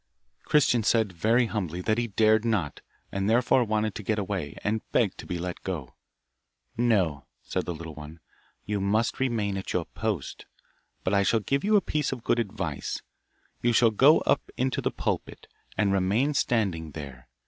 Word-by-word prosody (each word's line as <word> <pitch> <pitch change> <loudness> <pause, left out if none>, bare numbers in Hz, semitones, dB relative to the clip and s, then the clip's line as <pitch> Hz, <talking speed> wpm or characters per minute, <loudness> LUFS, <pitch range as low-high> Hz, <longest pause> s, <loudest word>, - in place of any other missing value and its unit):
Christian 130 -5 +3
said, 110 -2 +2
very 115 +8 +3
humbly, 90 -7 -3
that 110 +4 +1
he 120 - 0
dared 110 +1 +3
not, 105 -10 -1 0.3
and 100 +1 -1
therefore 125 +2 +4
wanted 110 -1 0
to - - -6
get 110 +2 -1
away, 95 -7 -3
and 110 +1 0
begged - - +1
to - - -8
be 90 - -2
let 90 +1 -5
go. 80 -9 -5 0.8
'No,' 95 - +1 0.2
said - - -2
the 85 - -2
little 80 0 -8
one, 75 +2 -10 0.5
'you 105 -1 -2
must 105 +4 +1
remain 110 -7 0
at 95 - -5
your 90 -2 0
post, 105 -10 -4 0.6
but 95 - 0
I 100 - +4
shall 110 +3 +3
give 135 +7 -1
you 215 +1 +3
a 205 - +6
piece 150 -5 -1
of 125 -3 -5
good 120 - +2
advice; 110 -4 -3 0.6
you 120 0 +2
shall 115 0 +5
go 135 +9 +6
up - - +1
into 130 0 0
the - - 0
pulpit, - - -3 0.3
and 100 -2 +2
remain 105 +10 +2
standing 95 - 0
there. 70 -4 -9
105 Hz, 180 wpm, -27 LUFS, 90-115 Hz, 0.8 s, a